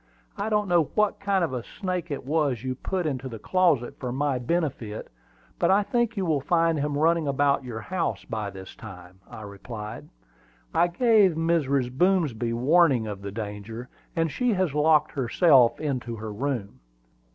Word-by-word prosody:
I 205 +2 -2
don't 210 -1 +1
know 175 -3 +3
what 210 -1 +2
kind 195 -2 +1
of 160 - -1
a 125 - -2
snake 180 - -4
it 140 -3 -5
was 140 -5 0
you 130 -1 -2
put 180 +7 -3
into 135 -3 -3
the 115 - -7
closet 160 - +1
for 125 -2 -4
my 135 0 0
benefit; 125 -7 -3 0.5
but - - +2
I 200 +2 +4
think 230 +2 0
you 190 - 0
will 155 -5 +1
find 165 +1 +2
him 145 0 -1
running 165 0 +2
about 140 0 +2
your 115 -3 -6
house 165 - -3
by 110 -2 -3
this 95 -1 -10
time," 95 -3 -12
I 110 - -9
replied. 105 +2 -8 0.6
"I 175 - +4
gave 210 0 +4
Mrs. 140 -6 0
Boomsby 150 - +1
warning 135 0 +3
of 105 -2 -6
the 100 0 -6
danger, 110 +3 -6 0.3
and 165 -2 0
she 245 - +1
has 185 -6 0
locked 150 0 +3
herself 130 -1 +4
into 130 -6 -3
her 110 -1 -6
room." 115 - -3
140 Hz, 175 wpm, -26 LUFS, 115-170 Hz, 0.6 s, I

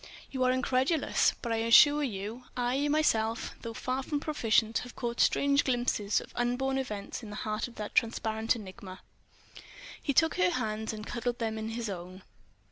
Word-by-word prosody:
You 260 -2 -1
are 255 - +4
incredulous? 260 +4 +2
But 235 - -2
I 225 - +1
assure 260 +6 +6
you, 225 -1 -4
I 250 +4 +1
myself, 230 -7 +1
though 230 -1 -6
far 255 +3 -2
from 290 +2 -2
proficient, 230 -7 +1
have 245 - -9
caught 235 -1 -4
strange 280 0 +3
glimpses 240 -5 +1
of - - -12
unborn 255 +3 0
events 210 -6 -5
in 220 - -9
the 210 - -7
heart 215 +2 -2
of 240 - -14
that 210 -1 -6
transparent 225 0 +1
enigma." 190 -3 -9 1.0
He 285 - 0
took 320 +4 +3
her 185 0 +4
hands 215 +3 -2
and 215 -1 -7
cuddled 240 +1 -3
them 220 -1 -2
in 220 0 -4
his 230 0 -3
own. 185 -1 -7
235 Hz, 175 wpm, -30 LUFS, 220-260 Hz, 1.0 s, assure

